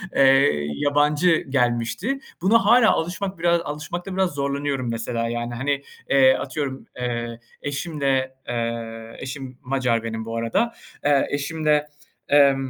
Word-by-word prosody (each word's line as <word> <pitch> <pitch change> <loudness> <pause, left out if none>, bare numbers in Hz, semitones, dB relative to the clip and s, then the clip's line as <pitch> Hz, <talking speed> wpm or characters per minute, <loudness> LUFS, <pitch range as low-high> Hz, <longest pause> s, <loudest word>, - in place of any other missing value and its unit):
eee, 135 - +4
yabancı 150 +4 +3
gelmişti. 120 - 0 0.2
Buna 210 +4 +4
hâlâ 230 +1 +6
alışmak 185 +2 -2
biraz 170 0 +3
alışmakta 170 +5 -5
biraz 185 -2 +1
zorlanıyorum 140 -2 -2
mesela 115 0 -2
yani 120 0 -3
hani. 140 +3 -1 0.3
Eee, 130 -1 +6
atıyorum, 135 0 -4
eee, 120 -1 -3 0.2
eşimle, 140 -3 -1
eee, 115 -1 -4
eşim 130 -1 -7
Macar 125 -3 0
benim 110 -1 -4
bu 115 0 -4
arada, 115 - 0 0.3
eee, 145 -1 +4
eşimle, 150 +1 0 0.4
emm, 140 -1 +6
140 Hz, 125 wpm, -23 LUFS, 120-150 Hz, 0.4 s, hâlâ